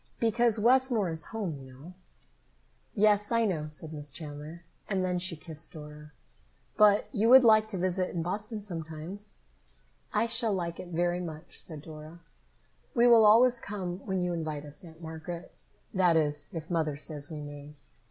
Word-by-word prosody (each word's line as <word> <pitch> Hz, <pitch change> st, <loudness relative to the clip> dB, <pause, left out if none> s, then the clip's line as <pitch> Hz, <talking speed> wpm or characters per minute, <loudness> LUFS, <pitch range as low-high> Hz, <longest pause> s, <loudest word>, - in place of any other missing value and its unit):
"Because 230 Hz, 0 st, +3 dB
Westmore 240 Hz, -4 st, +3 dB
is 160 Hz, -1 st, +2 dB
home, 195 Hz, -10 st, -4 dB
you 130 Hz, -1 st, -12 dB
know." 150 Hz, +8 st, -12 dB, 1.0 s
"Yes, 205 Hz, 0 st, +3 dB
I 230 Hz, -1 st, +3 dB
know," 160 Hz, -7 st, -1 dB
said 155 Hz, +1 st, -3 dB
Miss 145 Hz, -1 st, -3 dB
Chandler, 150 Hz, +3 st, -8 dB, 0.3 s
and 190 Hz, -2 st, 0 dB
then 180 Hz, -1 st, -1 dB
she 180 Hz, -1 st, 0 dB
kissed 160 Hz, +2 st, -4 dB
Dora. 150 Hz, -1 st, -11 dB, 0.6 s
"But 210 Hz, -1 st, +5 dB
you 225 Hz, -2 st, +1 dB
will 260 Hz, +1 st, +9 dB
like 215 Hz, -2 st, +5 dB
to 210 Hz, -3 st, -4 dB
visit 185 Hz, 0 st, 0 dB
in 170 Hz, -2 st, -3 dB
Boston 210 Hz, +4 st, -4 dB
sometimes?" 170 Hz, +2 st, -6 dB, 0.7 s
"I -, -, +2 dB
shall 230 Hz, -1 st, +2 dB
like 170 Hz, -3 st, -3 dB
it -, -, -7 dB
very 175 Hz, +1 st, 0 dB
much," 155 Hz, -3 st, -8 dB
said 155 Hz, -4 st, -6 dB
Dora. 155 Hz, +2 st, -11 dB, 0.7 s
"We 240 Hz, 0 st, +5 dB
will 235 Hz, -2 st, +7 dB
always 235 Hz, +3 st, +6 dB
come 185 Hz, -3 st, -5 dB
when 190 Hz, -2 st, -1 dB
you 180 Hz, 0 st, -1 dB
invite 155 Hz, -3 st, -4 dB
us, 150 Hz, +6 st, -5 dB
Aunt 165 Hz, -1 st, -13 dB
Margaret. 160 Hz, +2 st, -7 dB, 0.4 s
That 180 Hz, -3 st, +4 dB
is, 150 Hz, -1 st, -1 dB
if 165 Hz, -2 st, -7 dB
Mother 155 Hz, -4 st, 0 dB
says 145 Hz, -1 st, +1 dB
we 155 Hz, -2 st, -6 dB
may." 145 Hz, 0 st, -9 dB
175 Hz, 170 wpm, -29 LUFS, 155-210 Hz, 1.0 s, will